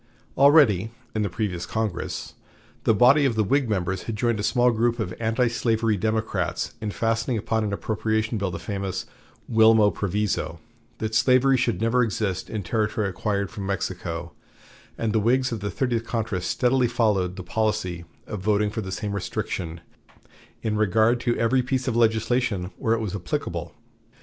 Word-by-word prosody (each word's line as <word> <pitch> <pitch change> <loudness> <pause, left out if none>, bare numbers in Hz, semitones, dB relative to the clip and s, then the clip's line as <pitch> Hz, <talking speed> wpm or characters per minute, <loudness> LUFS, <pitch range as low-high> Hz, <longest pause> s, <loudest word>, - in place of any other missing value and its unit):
Already, 135 - +5 0.2
in 110 - -1
the 105 - 0
previous 90 -3 -3
Congress, 110 -5 -3 0.5
the - - +5
body 130 +7 +6
of 130 -5 +2
the 110 - +2
Whig 135 +3 +1
members 95 -2 -1
had 115 - -2
joined 115 0 0
a - - 0
small 125 +3 +3
group 120 +1 +1
of 90 -6 -3
antislavery 115 -1 +1
Democrats 110 +2 -1
in 110 - -2
fastening 115 +3 0
upon 110 +1 -1
an 105 - -2
appropriation 110 +2 -1
bill 100 -1 -1
the 85 - -5
famous 100 -3 -4 0.4
"Wilmot 110 -2 +5
Proviso," 100 -5 -2 0.4
that 110 0 -3
slavery 130 +4 +4
should 125 -2 0
never 115 +2 +3
exist 100 -5 -1
in 110 -2 -3
territory 105 +2 0
acquired 100 +1 -2
from 100 -3 -6
Mexico, 85 -3 -3 0.7
and 110 -2 -1
the 110 - +3
Whigs 125 +4 +2
of 115 - -3
the 100 +1 -3
Thirtieth 120 -1 -1
Congress 110 -6 -2
steadily 125 +3 +2
followed 105 -6 +1
the 95 - -7
policy 100 -3 -1 0.2
of 105 - -5
voting 105 +1 +1
for 110 - -3
the 95 -2 -6
same 95 +3 -3
restriction 85 -4 -4 0.8
in 110 -1 0
regard 110 +3 +3
to 120 -1 0
every 120 +3 +2
piece 130 0 -2
of 120 - 0
legislation 110 -4 +1
where 115 0 +2
it 115 - -3
was 105 -4 -3
applicable. 90 -4 -4
110 Hz, 165 wpm, -24 LUFS, 100-115 Hz, 0.8 s, body